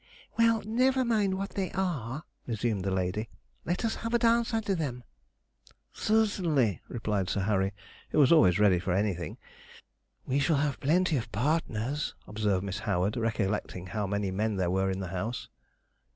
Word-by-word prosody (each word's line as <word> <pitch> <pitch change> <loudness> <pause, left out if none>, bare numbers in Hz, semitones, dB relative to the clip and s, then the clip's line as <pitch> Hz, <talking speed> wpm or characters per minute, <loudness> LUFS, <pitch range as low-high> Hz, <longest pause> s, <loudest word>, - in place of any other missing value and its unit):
'Well, 230 -1 +3
never 255 +4 +2
mind 210 -5 +2
what 195 +1 -4
they 190 -2 -2
are,' 155 - -2 0.2
resumed 110 -4 -1
the 95 - 0
lady; 95 +4 -1 0.4
'let 175 +7 -1
us 225 - -1
have 230 +1 -2
a - - +6
dance 235 0 +3
under 220 -3 0
them.' 135 -8 -3 0.9
'Certainly,' 175 - +1
replied 105 -5 -2
Sir 100 - 0
Harry, 95 -1 +1 0.4
who - - -2
was 140 -3 +6
always 95 - +6
ready 100 -4 +4
for 90 0 -1
anything. 90 -5 -1 0.9
'We 135 +2 +1
shall 145 +3 +2
have 145 -1 0
plenty 165 +2 +2
of 115 -2 -4
partners,' 140 +1 -1
observed 105 -3 0
Miss 100 +1 -3
Howard, 100 0 0
recollecting 105 -5 -1
how 105 +1 -2
many 100 -1 -1
men 105 +3 0
there 90 -2 0
were 95 +1 +1
in 95 0 -2
the 90 - -4
house. 100 +7 -4
115 Hz, 165 wpm, -29 LUFS, -, 0.9 s, a